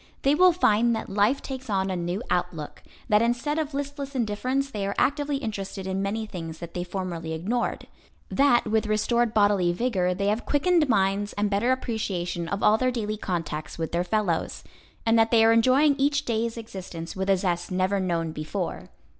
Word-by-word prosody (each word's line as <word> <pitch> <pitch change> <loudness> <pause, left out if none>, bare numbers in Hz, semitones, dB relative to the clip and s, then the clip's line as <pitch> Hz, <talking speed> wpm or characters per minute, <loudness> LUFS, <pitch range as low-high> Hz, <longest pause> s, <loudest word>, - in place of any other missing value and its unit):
They 275 - +4
will 365 +4 +6
find 235 -8 +3
that - - -5
life 210 +7 +2
takes 260 -2 -7
on 190 -1 0
a - - -1
new 175 +5 -3
outlook, 165 -4 -2 0.3
that 210 -2 +4
instead 245 +6 0
of 300 -2 -3
listless 280 0 -4
indifference 255 +4 -1
they 200 -4 -3
are 200 - -3
actively 290 0 +1
interested 200 -6 -5
in 190 0 -2
many 215 +3 -2
things 165 -6 -7
that 170 0 -9
they 175 - -3
formerly 175 -3 -4
ignored; 210 +10 -2 0.4
that 270 -3 +3
with 220 0 +1
restored 230 +2 +1
bodily 205 -4 +3
vigor 180 -3 0
they 200 +2 -2
have 215 +3 0
quickened 315 0 +2
minds 200 -1 +1
and 205 0 -1
better 210 +6 +2
appreciation 185 -9 -2
of 200 +3 -3
all 215 +1 +5
their 255 - +2
daily 215 -4 -2
contacts 165 -7 -4
with 160 -1 -3
their 170 +1 0
fellows, 180 -3 -1 0.4
and 225 0 +4
that 225 0 +4
they 225 -1 +5
are 225 - +6
enjoying 260 +6 +4
each 285 +1 +1
day's 230 0 -1
existence 185 -7 -7
with 190 +1 -2
a 195 - +5
zest 175 -2 -1
never 185 +2 +1
known 170 -3 -1
before. 155 0 -4
210 Hz, 190 wpm, -26 LUFS, 185-245 Hz, 0.4 s, will